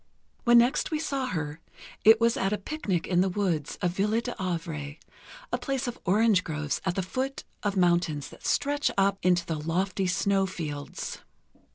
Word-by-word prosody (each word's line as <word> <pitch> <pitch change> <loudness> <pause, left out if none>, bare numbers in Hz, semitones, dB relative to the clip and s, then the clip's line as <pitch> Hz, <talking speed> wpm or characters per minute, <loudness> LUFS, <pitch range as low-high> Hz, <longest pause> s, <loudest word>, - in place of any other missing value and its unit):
When 240 0 +7
next 240 +4 +3
we 310 - 0
saw 275 -4 -2
her, 160 -7 -3 0.4
it 220 +1 +8
was 230 0 +3
at 195 - 0
a 210 - +1
picnic 200 - -2
in 180 -1 +2
the 190 - +2
woods 180 -6 -1
of 175 - +2
"Ville 210 +5 +1
D'Avray"... 170 - -4 0.6
a - - +3
place 270 -1 -2
of 240 - -5
orange 205 0 +4
groves 150 -2 -3
at 185 -2 0
the 190 - 0
foot 260 +8 -3 0.2
of 205 -2 -1
mountains 175 -5 +2
that - - -15
stretch 290 +1 +1
up 195 0 +3
into 175 -1 +3
the 160 -2 -3
lofty 185 +4 -1
snow 195 +1 +2
fields. 150 -6 -5
190 Hz, 175 wpm, -28 LUFS, 170-230 Hz, 0.6 s, it